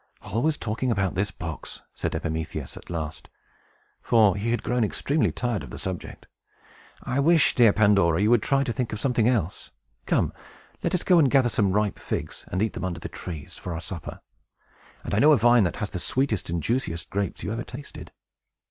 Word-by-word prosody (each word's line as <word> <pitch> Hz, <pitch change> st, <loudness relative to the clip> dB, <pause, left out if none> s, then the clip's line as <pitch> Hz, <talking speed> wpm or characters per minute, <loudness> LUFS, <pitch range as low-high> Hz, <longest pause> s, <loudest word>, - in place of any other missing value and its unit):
"Always 145 Hz, +7 st, 0 dB
talking 115 Hz, +4 st, -2 dB
about 95 Hz, -5 st, +1 dB
this 95 Hz, +1 st, 0 dB
box!" 80 Hz, -4 st, -7 dB
said -, -, -3 dB
Epimetheus, 80 Hz, 0 st, -4 dB
at -, -, -12 dB
last; 80 Hz, -2 st, -5 dB, 0.7 s
for 110 Hz, -5 st, +4 dB
he 105 Hz, +3 st, -2 dB
had 120 Hz, -1 st, 0 dB
grown 125 Hz, -1 st, +1 dB
extremely 140 Hz, +8 st, +1 dB
tired 120 Hz, -5 st, -2 dB
of -, -, -9 dB
the -, -, -8 dB
subject. 95 Hz, -3 st, -6 dB, 0.8 s
"I 130 Hz, -, -1 dB
wish, 160 Hz, +2 st, +4 dB
dear 120 Hz, -4 st, +6 dB
Pandora, 100 Hz, -6 st, +4 dB
you 105 Hz, +3 st, +3 dB
would 120 Hz, -3 st, +5 dB
try 135 Hz, +4 st, +2 dB
to 120 Hz, -, -2 dB
talk 125 Hz, -3 st, -2 dB
of 105 Hz, -, -4 dB
something 120 Hz, -2 st, +2 dB
else. 105 Hz, -8 st, -1 dB, 0.4 s
Come, -, -, +1 dB, 0.5 s
let -, -, 0 dB
us 180 Hz, -, -1 dB
go 180 Hz, -2 st, +5 dB
and 145 Hz, -4 st, +5 dB
gather 130 Hz, -3 st, +4 dB
some 100 Hz, -4 st, +1 dB
ripe 105 Hz, 0 st, 0 dB
figs, -, -, -5 dB
and 95 Hz, +3 st, -1 dB
eat 110 Hz, -, -1 dB
them -, -, -5 dB
under 85 Hz, -2 st, -3 dB
the -, -, -6 dB
trees, 80 Hz, -5 st, -8 dB
for 90 Hz, -2 st, -5 dB
our -, -, -4 dB
supper. 85 Hz, -1 st, -7 dB, 0.8 s
And -, -, -5 dB
I 100 Hz, -, +3 dB
know 150 Hz, +4 st, +7 dB
a -, -, +5 dB
vine 120 Hz, -1 st, +5 dB
that 85 Hz, -, -1 dB
has 105 Hz, -2 st, -4 dB
the 90 Hz, -, -4 dB
sweetest 120 Hz, -2 st, 0 dB
and 85 Hz, -2 st, -2 dB
juiciest 100 Hz, -, -2 dB
grapes 100 Hz, -2 st, -2 dB
you 105 Hz, -, -2 dB
ever 120 Hz, +1 st, -3 dB
tasted." 140 Hz, +3 st, -10 dB
105 Hz, 200 wpm, -25 LUFS, 90-125 Hz, 0.8 s, know